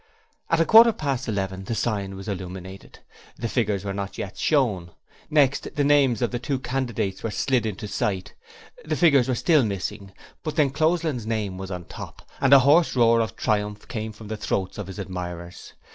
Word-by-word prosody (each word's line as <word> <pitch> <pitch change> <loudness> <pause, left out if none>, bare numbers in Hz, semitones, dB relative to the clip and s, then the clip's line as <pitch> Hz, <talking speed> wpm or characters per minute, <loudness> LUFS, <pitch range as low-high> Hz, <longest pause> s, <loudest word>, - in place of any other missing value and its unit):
At 165 - +2
a 165 - +4
quarter 225 +3 +8
past 135 -6 -2
eleven 95 -3 -3
the 115 - -3
sign 100 -4 -2
was 95 +1 -9
illuminated, 95 -1 -7 0.4
but - - -19
the - - +1
figures 105 -5 -1
were 100 - -2
not 100 0 -5
yet 100 - -5
shown. 105 - 0 0.4
Next, 145 -2 +2
the 145 - +1
names 140 -5 +3
of 120 - 0
the 120 - -2
two 135 +3 -2
candidates 120 -7 -3
were 115 - -2
slid 120 +1 0
into 105 +1 -5
sight, 100 -2 -2 0.5
the - - -2
figures 140 -8 +4
were 130 - +1
still 155 +2 +3
missing, 100 -1 -4 0.3
but 155 -2 -4
D'Encloseland's 155 -3 +1
name 105 -5 -2
was 95 0 -6
on 90 -2 -6
top, - - -10
and 135 - +3
a 140 - +11
hoarse 150 +5 +4
roar 115 -1 +5
of 110 - -3
triumph 105 -1 -1
came 110 -2 -4
from 110 0 -12
the 110 +1 -4
throats 95 -2 -2
of 100 - -5
his 95 - -8
admirers. 90 -3 -7
110 Hz, 190 wpm, -24 LUFS, 95-135 Hz, 0.5 s, a